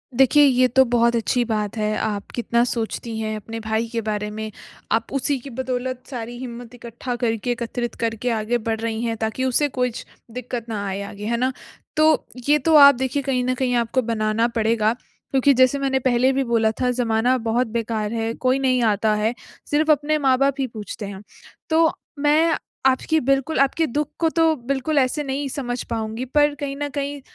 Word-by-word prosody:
देखिए, 270 +3 +5
ये 255 -1 +4
तो 265 +2 +5
बहुत 235 0 +2
अच्छी 235 +2 +1
बात 215 -1 -2
है 215 0 0
आप 205 -2 -3
कितना 235 0 +1
सोचती 230 -1 -3
हैं 215 -1 -2
अपने 225 +2 -7
भाई 220 +1 -1
के 230 -1 -1
बारे 210 -1 -2
में, 220 0 -5 0.4
आप 225 +1 +1
उसी 275 0 0
की 275 +3 -10
बदौलत 255 0 -3
सारी 240 -2 -6
हिम्मत 245 -1 -8
इकट्ठा 240 +1 -6
करके 225 +1 0
एकत्रित 240 0 -3
करके 225 +2 -2
आगे 225 +1 0
बढ़ 220 -1 0
रही 225 0 -2
हैं 230 -1 -1
ताकि 220 +3 -2
उसे 260 +3 +2
कुछ 250 -2 -1 0.3
दिक्कत 240 -1 -5
ना 205 -2 -3
आए 195 +1 -3
आगे, 205 +1 -8
है 235 +2 0
ना? 255 +2 +1 0.5
तो 310 0 +4 0.2
ये 295 - +5
तो 320 +4 +3
आप 280 -2 +9
देखिए 265 +2 -2
कहीं 255 -2 0
न 255 +1 0
कहीं 250 -1 0
आपको 240 +2 +1
बनाना 225 0 0
पड़ेगा। 225 -1 +1 0.4
क्योंकि 275 +1 +4
जैसे 255 +2 +4
मैंने 270 -1 +1
पहले 255 +1 +2
भी 270 - +1
बोला 230 -3 +2
था 250 - +2
ज़माना 245 +1 +1
बहुत 230 +2 0
बेकार 225 -1 -2
है 225 0 -1
कोई 255 +2 +1
नहीं 255 -2 +2
आता 215 0 +2
है, 215 +3 0 0.4
सिर्फ़ 310 +2 +3
अपने 300 +1 +2
माँ 265 -3 +3
बाप 275 0 +2
ही 265 - 0
पूछते 215 -2 -7
हैं। 195 0 -8 0.5
तो 320 0 +4 0.3
मैं 305 +3 +3 0.3
आपकी 265 +4 +3
बिल्कुल 275 +2 0
आपके 275 +4 +2
दुःख 290 +4 -1
को 330 -1 +3
तो 325 -1 +3
बिल्कुल 275 +3 -1
ऐसे 270 +3 0
नहीं 275 +1 -3
समझ 245 -3 -3
पाऊँगी, 225 +2 -3
पर 295 +3 +2
कहीं 280 -1 -3
न 290 - 0
कहीं 285 0 -4
245 Hz, 195 wpm, -22 LUFS, 225-270 Hz, 0.5 s, आप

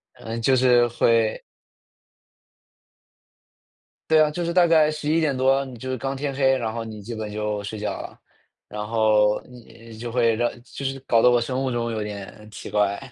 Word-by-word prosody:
嗯， 115 +1 -6
就 130 +2 +3
是 120 -1 +4
会 115 -1 +1 2.7
对 155 -1 +6
啊， 155 - +5
就 170 +3 -4
是 170 - -1
大 180 -1 +5
概 155 -2 +4
11:00 155 -1 0
多 135 +1 +2
你 125 -3 -10
就 130 - -7
是 130 - -2
刚 135 +2 -4
天 140 0 -3
黑， 135 -1 +3
然 110 -2 -3
后 115 - -3
你 110 -1 -8
基 115 +4 -7
本 110 -1 -5
就 105 -1 -3
睡 105 +2 -6
觉 105 - -2
了。 - - -11 0.5
然 105 0 -6
后 105 -2 +2
你 115 -2 -14
就 120 0 -5
会 115 -2 +2
让 120 +1 0
就 140 - -9
是 135 0 -2
搞 115 -1 +3
得 125 - +6
我 120 -1 +3
生 130 +3 -2
物 130 - -1
钟 115 -1 -2
有 110 -1 -3
点 105 +1 -8
奇 - - -9
怪。 100 -1 +1
120 Hz, 200 characters per minute, -23 LUFS, 110-135 Hz, 2.7 s, 对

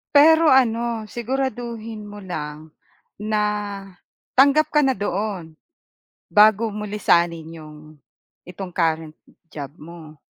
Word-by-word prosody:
Pero 320 +2 +7
ano, 235 -4 +2
siguraduhin 235 -2 -4
mo 205 0 -10
lang, 155 -3 -7 0.5
na, 210 0 0 0.9
tanggap 285 +3 +5
ka 300 - +4
na 265 - +2
doon, 195 -4 -4 0.7
bago 215 +1 +5
mo 210 - -5
lisanin 170 -6 +1
'yong, 155 -1 -12 0.7
itong 180 0 -8
current 160 -2 -1 0.3
job 145 -4 -8
mo. 160 -1 -12
210 Hz, 105 wpm, -22 LUFS, 165-235 Hz, 0.9 s, Pero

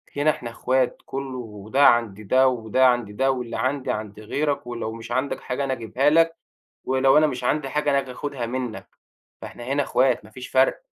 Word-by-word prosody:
هنا 145 +2 +2
إحنا 125 -5 -2
إخوات، 130 +2 0
كلّه 135 -1 -5
وده 110 +4 0
عَند 110 -3 +2
ده 130 +6 +4
وده 125 +1 +2
عَند 120 -4 +1
ده 135 +6 +1
واللي 125 -3 -4
عندي 130 +3 -1
عند 105 -1 -5
غيرك 140 +5 -2
ولو 115 -2 -4
مش 115 +1 -9
عندك 130 +3 -1
حاجة 125 +3 -3
أنا 135 -1 -1
اجيبها 120 +4 +1
لك، 165 +1 +4 0.5
ولو 130 +2 +4
أنا 155 - +5
مش 125 -4 -4
عندي 145 +2 0
حاجة 150 +1 0
أنا 140 - +3
آجي 135 -2 -4
آخُدها 135 -3 -4
منك. 125 -2 -5 0.5
فإحنا 120 - -8
هنا 140 +3 0
إخوات 130 -4 +1
مافيش 120 +4 -10
فَرق. 130 - +2
130 Hz, 190 wpm, -24 LUFS, 115-140 Hz, 0.5 s, أنا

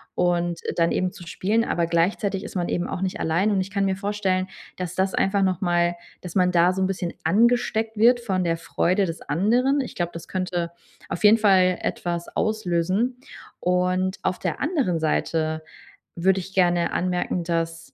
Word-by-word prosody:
und 175 -1 0 0.2
dann 170 -1 +2
eben 185 0 0
zu 175 - -11
spielen. 205 +6 0
Aber 170 -1 0
gleichzeitig 190 +4 0
ist - - -9
man 175 -1 -1
eben 175 - -1
auch - - -4
nicht 190 -1 -2
allein 170 +7 +1
und 195 -2 +2
ich 190 - -6
kann 200 0 0
mir 190 - +1
vorstellen, 195 -2 -1 0.3
dass 180 -2 -5
das 190 0 0
einfach 195 +1 +2
nochmal 175 -2 +1 0.3
dass 180 0 -8
man 180 -1 +3
da 180 +1 +4
so 190 - -2
'n 190 - +2
bisschen 180 -3 -3
angesteckt 225 +3 +2
wird 240 +3 +5
von 190 -6 -1
der 165 -1 0
Freude 180 +3 +1
des 165 -1 -5
anderen. 240 - +2
Ich 260 - -4
glaube, 175 -1 -2
das 170 - -8
könnte 180 -2 -2 0.4
auf 175 - -5
jeden 215 +2 +7
Fall 185 -4 +4
etwas 170 -1 -3
auslösen. 215 +3 0 0.4
Und 180 +1 0
auf 180 - -1
der - - -3
anderen 270 - 0
Seite 160 0 -1 0.5
würde 190 +2 +2
ich 190 +2 -11
gerne 175 -2 +2
anmerken, 180 -1 -1
dass 165 -1 -3
185 Hz, 180 wpm, -24 LUFS, 175-200 Hz, 0.5 s, jeden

